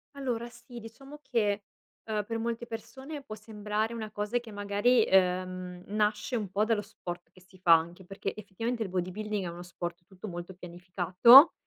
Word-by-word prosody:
Allora 240 -4 -2
sì, 240 +1 -11
diciamo 270 +6 -11
che, 210 -6 0 0.5
uhm, 210 -1 0
per 225 +1 -3
molte 235 +1 -2
persone 265 +6 -7
può 215 -6 -7
sembrare 215 +1 -2
una 220 -2 -5
cosa 210 +3 -1
che 235 -2 -11
magari, 205 +4 +3
uhm, 185 -1 +1
nasce 210 +3 0
un 210 -5 -2
pò 200 +3 +1
dallo 220 -1 +2
sport 180 -5 -8
che 185 - -19
si 185 +1 -20
fa, 175 -2 +7
anche 170 +3 +1
perché, 195 +1 -4
effettivamente, 225 +3 -3
il 200 - -5
bodybuilding 190 +3 -2
è - - -2
uno 170 +1 -8
sport 175 0 -6
tutto 190 +3 -10
molto 175 0 -7
pianificato, 180 - +7
210 Hz, 175 wpm, -30 LUFS, 185-230 Hz, 0.5 s, fa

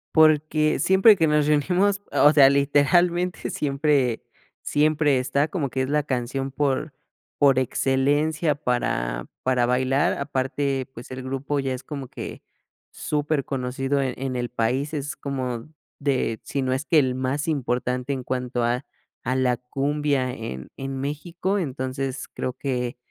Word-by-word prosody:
Porque 155 -1 +4
siempre 190 +7 +6
que 165 - +2
nos 150 -1 +2
reunimos, 180 +7 +2
o 150 - +5
sea, 140 -2 +8
literalmente 170 +6 +2
siempre 140 -4 +1 0.4
siempre 150 -2 +2
está 140 +3 +1
como 155 -4 -2
que 130 +1 -2
es 130 - -3
la 150 0 +1
canción 135 0 -2
por 140 +1 -1 0.4
por 140 -3 +4
excelencia 145 +5 +1
para 60 - -1 0.2
para 125 -2 +2
bailar. 130 +3 +2
Aparte, 135 -1 -1
pues, 120 +1 -10
el 130 0 -6
grupo 135 +2 -2
ya 135 -1 -1
es 130 0 -6
como 140 -3 -6
que - - -8 0.5
superconocido 140 -2 -1
en 130 -2 -1
en 130 -1 -3
el 120 -1 -2
país, 125 +5 -1
es 145 -1 -3
como 130 -2 -4 0.3
de, 135 -6 0
si 140 - -3
no 130 -1 0
es 130 +2 -1
que 165 -2 +4
el 130 -3 +1
más 130 +4 -2
importante 125 -3 -1
en 130 -2 -3
cuanto 125 -1 -2
a 125 +3 0 0.4
a 130 +2 -1
la 125 -1 +2
cumbia 140 +1 -1
en 65 - -7
en 135 0 -5
México. 170 +7 -2
Entonces 135 -4 -3
creo 130 - -4
que 125 -3 -2
135 Hz, 150 wpm, -24 LUFS, 130-150 Hz, 0.5 s, sea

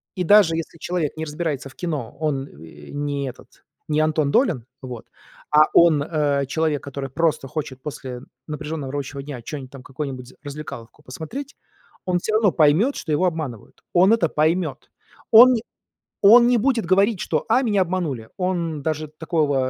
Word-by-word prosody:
И 185 - -1
даже 195 -3 +5
если 165 0 -5
человек 175 -4 -2
не 160 - -3
разбирается 150 -3 -3
в 130 - -18
кино, 150 -10 -4
он, 140 -3 -1
э, 75 - -14
не 145 -1 -3
этот, 125 - -16 0.3
не 150 0 +1
Антон 155 -2 +1
Долин, 160 - +2 0.2
вот. 125 -4 -8 0.5
А 150 0 +7
он, 165 -4 +5
э, 145 -2 0
человек, 155 0 0
который 140 -1 -6
просто 155 0 0
хочет 135 -3 -5
после 130 -4 -6 0.3
напряжённого 150 -2 -5
рабочего 140 0 -5
дня 135 -3 -7
что-нибудь 140 -4 -6
там, 135 -2 -11
какую-нибудь 130 -2 -6
развлекаловку 145 -3 -9
посмотреть, 160 - -7 0.5
он 180 -1 +1
всё 215 - -3
равно 215 -3 +4
поймёт, 165 - +3
что 160 - -5
его 150 +5 +2
обманывают. 150 - -7
Он 185 +3 +5
это 225 -7 +2
поймёт. 155 -2 0 0.4
Он 245 +3 +9 0.7
он 235 +4 +8
не 245 -1 +4
будет 235 -1 +1
говорить, 195 +3 +3
что: 155 -3 -1
"А, 250 +4 +4
меня 205 -6 +2
обманули". 165 -11 -3
Он 170 -5 -2
даже 155 0 -2
такого, 155 -2 -1
155 Hz, 165 wpm, -22 LUFS, 140-180 Hz, 0.7 s, Он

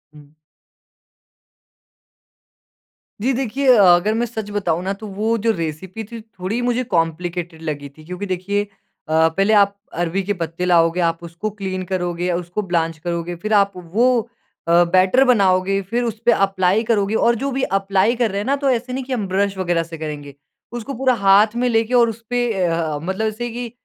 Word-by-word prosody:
हुँ। 145 0 -17 2.9
जी 255 +5 +1
देखिए 265 +2 -2
अ, 210 - +5
अगर 195 +5 0
मैं 235 +2 0
सच 220 -3 -6
बताऊँ 180 -4 -1
ना 195 +1 -1
तो 215 +2 -9
वो 225 +2 +1
जो 225 - +5
रेसिपी 175 +3 -5
थी 230 +2 -9
थोड़ी 215 +1 -4
मुझे 245 +1 0
कॉम्प्लिकेटेड 170 0 -2
लगी 145 -3 -5
थी 155 +3 -17
क्योंकि 180 +4 -5
देखिए 195 +2 -1
अ, - - -13 0.6
पहले 195 +6 +1
आप 200 -1 +4 0.2
अरबी 175 +3 -1
के 205 +2 -1
पत्ते 170 -1 -4
लाओगे, 170 -1 +3
आप 165 -1 +1
उसको 170 +5 -5
क्लीन 190 -3 -5
करोगे, 175 -1 -1
उसको 175 +3 -3
ब्लॉन्च 165 -4 -1
करोगे, 175 0 -3
फ़िर 215 +6 -3
आप 200 -1 +4
वो 220 +9 +1 0.5
अ, 170 +1 +5
बैटर 185 +8 +4
बनाओगे, 195 -5 +3
फ़िर 230 +6 -2
उसपे 230 0 0
अप्लाई 195 0 +2
करोगे 215 -2 +1
और 235 +1 +3
जो 275 - -1
भी 265 0 -2 0.2
अप्लाई 195 +4 +1
कर 230 -4 0
रहे 200 - -3
हैं 205 - -3
ना, 275 +3 +2
तो 280 -1 0
ऐसे 250 0 -1
नहीं 265 - -3
कि 260 +1 -5
हम 215 -6 -2
ब्रश 195 +1 0
वगैरह 175 -3 0
से 165 0 -9
करेंगे। 150 -2 -6 0.4
उसको 240 +3 -5
पूरा 260 +1 +2
हाथ 205 +3 +5
में 245 +1 +1
लेके 225 +1 +1
और 235 -1 +5
उसपे 230 +2 -2
ए, 200 -5 -1
अ, 165 -3 -1
मतलब 190 +5 -1
ऐसे 230 +3 -4
कि 240 0 -6
195 Hz, 185 wpm, -20 LUFS, 175-230 Hz, 2.9 s, अ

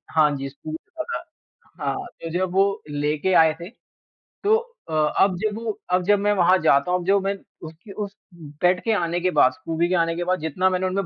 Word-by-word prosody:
हाँ 155 -1 +5
जी, 135 0 -5
स्कूबी 155 +3 -7 0.2
रखा 315 - 0
था। 470 - -5 0.6
हाँ, - - 0 0.3
तो 165 - -5
जब 185 -1 -1
वो 195 +1 +2
लेके 150 +5 0
आए 160 -1 +3
थे, 170 - -7 0.7
तो 425 +2 +5 0.3
अ, - - -5 0.3
अब 190 -2 +1
जब 215 -1 -1
वो 220 -3 -3
अब 180 0 +3
जब 205 +1 +4
मैं 205 +1 +2
वहाँ 185 -1 +4
जाता 140 +2 +3
हूँ, 180 -1 +1
जो 200 +2 +4
मैं 195 +1 -1 0.3
उसकी 165 +6 -13
उस 200 0 -5 0.5
पेट 180 +1 +4
के 225 - 0
आने 175 -3 0
के 185 - +1
बाद, 130 -3 +6
स्कूबी 165 +4 -2
के 185 - +2
आने 165 0 0
के 175 - -2
बाद, 185 0 0
जितना 160 +4 +1
मैंने 185 0 0
उनमें 195 +1 -1
180 Hz, 215 wpm, -23 LUFS, 160-195 Hz, 0.7 s, बाद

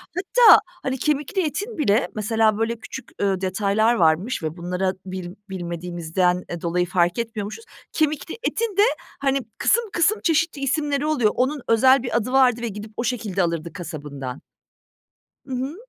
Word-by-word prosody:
Hatta 440 +5 +6 0.2
hani 265 0 -1
kemikli 300 - 0
etin 410 +9 -4
bile 225 -8 +2
mesela 215 0 +2
böyle 225 +1 -1
küçük, 265 - -9
ııı, 195 -2 +1
detaylar 200 +4 +2
varmış 175 +3 +1
ve 155 +2 -3
bunlara 180 +2 -1
bil 185 -2 -6 0.2
bilmediğimizden, 175 0 -1
eee, 170 -1 -5
dolayı 175 +1 0
fark 175 +2 +1
etmiyormuşuz. 225 - -5 0.3
Kemikli 310 +4 -1
etin 450 -5 -1
de 405 - +6 0.4
hani 275 0 +1 0.2
kısım 475 - +3
kısım 380 +6 +2
çeşitli 325 -3 +1
isimleri 285 +1 0
oluyor. 260 -9 +2
Onun 270 +2 0
özel 260 +3 +5
bir 240 - 0
adı 235 +2 -2
vardı 255 -3 +4
ve 235 - -2
gidip 210 0 -7
o - - -1
şekilde 215 -6 -1
alırdı 170 -1 -2
kasabından. 145 -6 -7 1.0
Hı 270 - -11
hı. 260 +5 -3
225 Hz, 155 wpm, -23 LUFS, 180-275 Hz, 1.0 s, Hatta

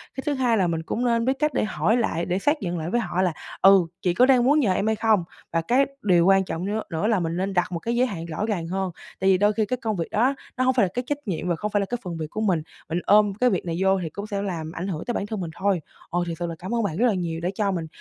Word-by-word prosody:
Cái 265 - -5
thứ 295 - +1
2 250 -4 +2
là 185 -3 +2
mình 165 -1 -1
cũng 240 +9 -2
nên 230 -1 +2
biết 260 - +3
cách 300 0 +1
để - - +1
hỏi 215 +2 +1
lại 170 -7 0
để 180 +1 -1
xác 295 +8 +1
nhận 175 -2 -2
lại 160 +1 -3
với 240 +6 +1
họ 185 -5 -1
là 180 -3 +1 0.3
"Ừ, 190 -3 +6
chị 180 - +1
có 245 +8 +5
đang 255 -2 +5
muốn 290 +5 +4
nhờ 200 -9 +2
em 200 +3 0
hay 220 - +2
không?" 215 -4 +2 0.3
và 165 - +2
cái 255 +10 +3 0.2
điều 175 -4 +4
quan 195 0 +5
trọng 175 0 -4
nưa 210 +2 -1
nữa 165 +6 -1
là 220 -3 +2
mình 170 0 -2
nên 195 +1 -1
đặt 180 0 +1
một 170 - -2
cái 235 +6 -2
giới 250 +2 +3
hạn 170 -8 -5
rõ 170 +5 -3
ràng 190 -7 -2
hơn, 190 +1 -2 0.3
tại 190 - +2
vì 190 - +5
đôi 205 +2 +3
khi 215 0 +1
cái 255 +4 -2
công 225 -4 -2
việc 165 -3 -2
đó 255 +6 +2 0.2
nó 255 - +2
hông 260 0 +3
phải 240 -6 +4
là - - -3
cái 245 - -2
trách 290 - -1
nhiệm 180 -2 -2
và 175 - +1
không 210 +6 -4
phải 205 - +2
là 200 - 0
cái 245 +4 -3
phần 175 -3 -5
việc 155 -1 -4
của 215 - -4
mình, 185 -7 +2 0.3
mình 170 +2 0
ôm 210 -1 +5
cái 250 +5 +2
việc 185 - -1
này 165 -1 -2
vô 190 0 +3
thì 160 - -3
cũng 200 +6 -7
sẽ 200 -2 -2
làm 165 -5 -4
ảnh 175 +4 -5
hưởng 165 -4 -4
tới 240 - -2
bản 200 - -2
thân 215 0 -4
mình 165 -2 -4
thôi. 190 -1 0 0.3
Ờ, 175 - 0
thiệt 165 -1 -4
sự 175 - -2
là 165 - -5
cảm 190 +6 -3
ơn 230 - +1
bạn 175 -5 -2
rất 240 - +3
là 230 - +2
nhiều 170 -3 -2
đã 175 - -1
cho 200 -1 +1
mình 170 -4 -3
195 Hz, 335 wpm, -24 LUFS, 175-225 Hz, 0.3 s, Ừ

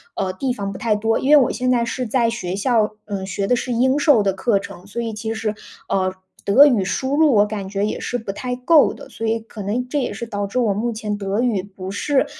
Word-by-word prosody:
呃， 190 -1 -1
地 255 +6 -2
方 200 -5 -4
不 195 - -7
太 220 -1 +1
多。 225 +2 0
因 270 - -1
为 300 - +8
我 260 -5 +3
现 255 0 -1
在 245 -2 +3
是 250 +2 -3
在 235 0 +2
学 185 -5 -3
校， 215 0 +1
嗯， 200 -2 -4
学 195 +1 -2
的 250 - +3
是 250 +1 -3
英 260 +4 +2
授 285 -9 +4
的 195 - +2
课 200 +3 +1
程， 195 -1 -10
所 235 +4 -4
以 230 -1 -3
其 220 +1 -4
实， 220 -1 -2 0.4
呃， 185 -1 0 0.3
德 255 +9 +7
语 240 -9 +3
输 265 +8 -1
入 310 -3 +5
我 205 0 +5
感 205 -2 -5
觉 200 +1 -1
也 215 - -3
是 245 - -2
不 220 -4 -5
太 250 +5 -4
够 285 +5 +4
的， - - -12
所 225 - -4
以 225 +1 +1
可 220 -1 -10
能 225 +6 -2
这 290 - 0
也 255 - -2
是 220 +3 -5
导 205 -3 -3
致 200 - -5
我 225 -5 +2
目 230 +4 -1
前 210 -1 -3
德 200 +2 -1
语 235 -6 +1
不 190 -1 -8
是 275 +8 +1
220 Hz, 280 characters per minute, -21 LUFS, 200-250 Hz, 0.4 s, 为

